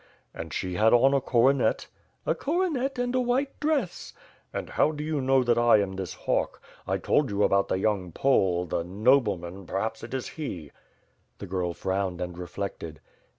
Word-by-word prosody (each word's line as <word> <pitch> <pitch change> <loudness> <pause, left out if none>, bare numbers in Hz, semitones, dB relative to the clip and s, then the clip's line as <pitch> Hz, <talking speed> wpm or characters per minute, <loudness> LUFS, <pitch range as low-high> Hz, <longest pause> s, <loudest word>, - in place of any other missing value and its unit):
"And - - -7
she 90 -1 -3
had 110 +5 +4
on 135 +3 +5
a 140 - +3
coronet?" 130 +2 +2 0.4
"A - - +2
coronet 285 -5 -1
and 245 0 -1
a 255 - +2
white 255 +3 -1
dress.'' 290 - -1 0.4
And - - -5
how - - +3
do 150 -1 -5
you 155 -2 -1
know 130 0 +3
that 120 -1 +2
I 120 -2 +6
am 100 -2 -1
this 95 -2 -5
hawk? - - -1 0.3
I - - +1
told 145 -3 +1
you 100 0 +1
about 100 0 +3
the - - 0
young 95 -3 0
Pole, 90 -7 +2
the 85 0 -2
nobleman, 100 -3 +1
perhaps 110 +4 -2
it 120 +3 -5
is 130 - -3
he?" 90 - -6 0.7
The - - -7
girl 90 -2 -2
frowned 95 -2 -2
and 90 -1 -4
reflected. 90 -3 -6
110 Hz, 180 wpm, -27 LUFS, 95-145 Hz, 0.7 s, I